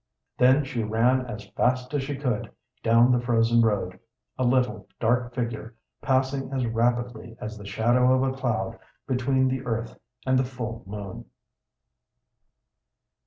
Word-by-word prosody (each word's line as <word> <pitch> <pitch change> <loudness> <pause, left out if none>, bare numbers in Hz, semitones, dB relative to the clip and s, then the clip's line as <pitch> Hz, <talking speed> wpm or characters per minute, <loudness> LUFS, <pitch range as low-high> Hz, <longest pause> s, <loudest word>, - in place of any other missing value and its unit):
Then 130 +3 +5
she 125 -3 -3
ran 120 +4 +2
as 105 -3 -7
fast 125 +2 0
as 145 - +1
she 140 +1 -3
could 125 -6 -2 0.3
down 115 +2 +5
the 125 - +4
frozen 115 -1 +3
road, 100 -5 0 0.4
a 130 - -1
little, 120 -4 +1
dark 120 +1 +1
figure, 115 -1 -4 0.3
passing 135 0 0
as 130 -2 0
rapidly 115 0 -1
as 110 0 -6
the 100 -1 -10
shadow 120 +5 +3
of 130 0 +3
a 130 0 0
cloud 125 -4 -2 0.3
between 130 +1 +1
the 130 0 -2
earth 115 -2 -3 0.3
and 130 0 +3
the - - +3
full 120 -3 -5
moon. 100 -1 -7
120 Hz, 145 wpm, -26 LUFS, 115-130 Hz, 0.4 s, Then